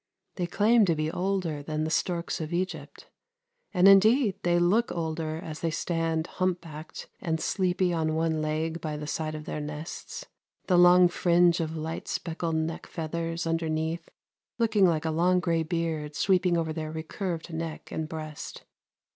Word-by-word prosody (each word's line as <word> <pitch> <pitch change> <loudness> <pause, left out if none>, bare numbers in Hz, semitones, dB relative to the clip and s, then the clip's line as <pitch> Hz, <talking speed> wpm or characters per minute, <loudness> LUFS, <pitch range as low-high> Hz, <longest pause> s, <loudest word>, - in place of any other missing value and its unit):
They 175 -2 -2
claim 215 +5 +4
to 170 -3 +2
be 155 +1 -1
older 180 -5 -1
than 155 +1 -2
the 160 - -2
storks 170 0 -1
of 155 +1 -5
Egypt, 185 +2 -4 0.6
and 185 -1 +5
indeed, 215 +3 +6
they 175 0 +2
look 195 +7 +3
older 160 -1 -2
as 160 -2 -7
they 165 - 0
stand 165 0 -1
humpbacked 170 -5 -4
and 160 -3 -1
sleepy 180 0 +1
on 160 -1 0
one 160 -1 0
leg 160 +2 -2
by 155 -2 -3
the 150 - -5
side 155 +1 -3
of 155 0 -7
their 150 - -4
nests, 150 +2 -6 0.4
the 185 - +2
long 180 0 +8
fringe 175 -1 +3
of 160 0 -2
light 160 +1 -5
speckled 165 -1 -2
neck 160 +1 -2
feathers 165 +1 -3
underneath 165 0 -1 0.5
looking 215 -5 +4
like 165 -2 0
a 160 - +1
long 180 +3 +3
gray 170 -2 +1
beard 160 -2 -2
sweeping 180 -1 +3
over 160 -1 -1
their 155 -1 -4
recurved 165 +1 -4
neck 165 -1 -5
and 160 -1 -3
breast. 155 -2 -7
165 Hz, 165 wpm, -28 LUFS, 155-180 Hz, 0.6 s, long